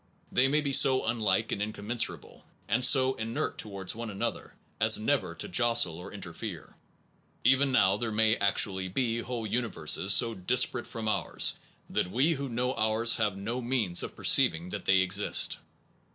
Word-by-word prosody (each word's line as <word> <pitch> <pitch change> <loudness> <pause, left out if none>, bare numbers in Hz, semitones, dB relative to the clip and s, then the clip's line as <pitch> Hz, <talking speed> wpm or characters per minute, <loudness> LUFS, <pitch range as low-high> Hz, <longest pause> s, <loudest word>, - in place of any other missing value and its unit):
They 130 +2 +3
may 150 +3 +1
be 140 -2 -3
so 130 -1 +4
unlike 110 -4 -1
and 100 - -3
in 105 +1 -3
commensurable, 110 +4 -3 0.2
and 125 +2 0
so 130 0 +5
inert 110 +1 -4
towards 100 -3 -3
one 115 0 -6
an 100 -1 -6
other, - - -5 0.2
as - - +5
never - - -1
to - - -3
jostle 115 -6 +2
or 90 +3 -10
interfere. 95 -2 -8 0.7
Even 135 +1 +3
now 95 -6 +3
there 110 +1 -4
may 110 +1 +2
actually 100 -2 +1
be 115 +4 -2
whole 120 -1 -5
universes 100 -5 -1
so 115 +3 +5
dis 110 +6 +2
parate 120 - -7
from 110 -1 -6
ours 110 - 0 0.3
that 90 - -2
we 135 - +1
who 140 -2 -5
know 125 +2 -2
ours 110 +1 +1
have 105 -4 -1
no 115 +6 -4
means 115 -8 0
of - - -6
perceiving 85 +3 +2
that 100 0 -6
they 95 0 +4
exist. 100 +2 +2
110 Hz, 175 wpm, -28 LUFS, 100-125 Hz, 0.7 s, so